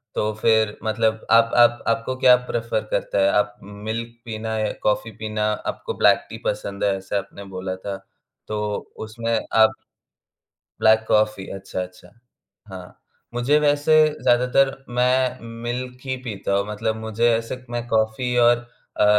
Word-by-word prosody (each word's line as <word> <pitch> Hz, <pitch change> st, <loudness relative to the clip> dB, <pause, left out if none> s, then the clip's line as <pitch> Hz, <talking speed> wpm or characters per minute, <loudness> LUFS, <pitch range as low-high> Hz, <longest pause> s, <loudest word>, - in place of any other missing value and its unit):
तो 105 Hz, 0 st, 0 dB
फिर 110 Hz, -2 st, +3 dB
मतलब 110 Hz, 0 st, 0 dB
आप 115 Hz, 0 st, +5 dB
आप 120 Hz, 0 st, +5 dB
आपको 115 Hz, +3 st, 0 dB
क्या 125 Hz, -1 st, +7 dB
प्रेफर 115 Hz, -2 st, -1 dB
करता -, -, 0 dB
है? 95 Hz, -, +4 dB
आप 105 Hz, 0 st, +1 dB
उम, 100 Hz, -, -12 dB, 0.2 s
मिल्क 115 Hz, +1 st, -3 dB
पीना 110 Hz, -1 st, -4 dB
या 105 Hz, -1 st, 0 dB
कॉफ़ी 105 Hz, +2 st, 0 dB
पीना? 110 Hz, 0 st, -1 dB
आपको 105 Hz, -, -4 dB
ब्लैक-टी -, -, +3 dB
पसंद 100 Hz, 0 st, -3 dB
है 100 Hz, -1 st, +2 dB
ऐसा 95 Hz, +1 st, -3 dB
आपने 100 Hz, +1 st, -10 dB
बोला 95 Hz, 0 st, -3 dB
था, 95 Hz, +1 st, -6 dB, 0.5 s
तो 105 Hz, 0 st, -3 dB, 0.4 s
उसमें 115 Hz, +1 st, -1 dB, 0.2 s
आप 110 Hz, 0 st, +4 dB, 1.1 s
ब्लैक 110 Hz, 0 st, +4 dB
कॉफ़ी 105 Hz, -2 st, +2 dB
अच्छा, 95 Hz, -1 st, -5 dB
अच्छा। 90 Hz, 0 st, -10 dB, 0.6 s
हाँ, 90 Hz, -1 st, -10 dB, 0.3 s
मुझे 120 Hz, +5 st, +2 dB
वैसे 145 Hz, +1 st, +2 dB, 0.3 s
ज़्यादातर 125 Hz, +2 st, +4 dB, 0.3 s
मैं 125 Hz, 0 st, +2 dB, 0.2 s
मिल्क 125 Hz, +1 st, -4 dB
ही 130 Hz, -1 st, -1 dB
पीता 100 Hz, -3 st, -3 dB
हूँ 100 Hz, +1 st, 0 dB
मतलब 110 Hz, +1 st, -2 dB
मुझे 110 Hz, +2 st, 0 dB
ऐसे 120 Hz, +2 st, -6 dB
मैं 120 Hz, 0 st, -4 dB
कॉफ़ी 110 Hz, +2 st, 0 dB
और 120 Hz, 0 st, +5 dB, 0.4 s
अ, -, -, +5 dB
110 Hz, 150 wpm, -22 LUFS, 105-120 Hz, 1.1 s, क्या